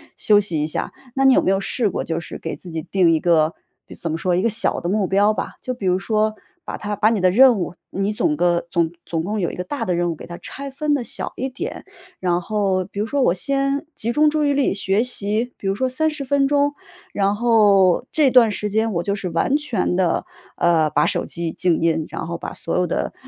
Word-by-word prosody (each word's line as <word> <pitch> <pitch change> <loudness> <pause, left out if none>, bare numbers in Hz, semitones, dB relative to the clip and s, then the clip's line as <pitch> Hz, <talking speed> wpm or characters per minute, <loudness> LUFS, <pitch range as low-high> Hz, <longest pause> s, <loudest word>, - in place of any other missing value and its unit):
休 210 -1 +4
息 170 -7 -1
一 - - +1
下。 155 - -4 0.2
那 270 0 +2
你 265 - +7
有 - - +4
没 190 - +1
有 195 - +2
试 210 +2 -1
过， - - -3
就 165 0 -2
是 - - -8
给 160 - -5
自 175 +4 -11
己 160 0 -3
定 180 +1 +2
一 160 - +2
个 160 -1 +2 0.3
比 - - -12
怎 170 - -5
么 160 - -2
说， 180 +1 0
一 - - +1
个 230 - +2
小 220 0 0
的 - - -4
目 200 +2 +1
标 200 +3 +3
吧。 - - -5
就 255 - -3
比 240 -6 -7
如 185 0 +2
说， 215 +1 0 0.3
把 - - -5
它 210 0 -4
把 210 +2 +3
你 225 -2 0
的 185 0 +3
任 250 +3 +6
务， 175 -2 -3 0.2
你 195 +2 -1
总 300 +7 0
个 175 -1 +1
总 170 -2 +1
总 165 -1 -3
共 210 +4 -2
有 175 - 0
一 - - -7
个 180 - -4
大 230 +5 -4
的 180 -4 0
任 175 0 0
务 - - -5
给 - - -11
它 175 - -8
拆 280 +8 -8
分 295 +2 -1
得 275 -4 0
小 - - -5
一 265 +2 -3
点。 350 - -6 0.4
然 175 -1 0
后 195 -2 0
比 200 +2 -8
如 210 - -1
说 280 +3 0
我 175 - +3
先 275 +7 -1
集 230 - 0
中 300 +5 +4
注 305 0 0
意 285 - +2
力 280 -1 +2
学 195 +1 +1
习， 230 0 -1
比 - - -12
如 195 - +2
说 260 +6 -1
30 300 +2 -1
分 275 +1 +2
钟， 285 0 +1 0.4
然 200 0 +1
后 205 -4 +4
这 300 -4 +4
段 245 -4 +5
时 210 +1 -3
间 220 +1 0
我 170 - 0
就 200 +3 -1
是 190 -3 -4
完 170 - +1
全 245 -12 -1
地， 180 -2 +1 0.3
呃， 160 -3 +3
把 - - +2
手 - - 0
机 170 -1 -3
静 170 0 +1
音， 160 -1 +1
然 - - -6
后 170 0 -4
把 - - -7
所 165 - -3
有 180 - +2
的 170 - -2
200 Hz, 270 characters per minute, -21 LUFS, 175-250 Hz, 0.4 s, 你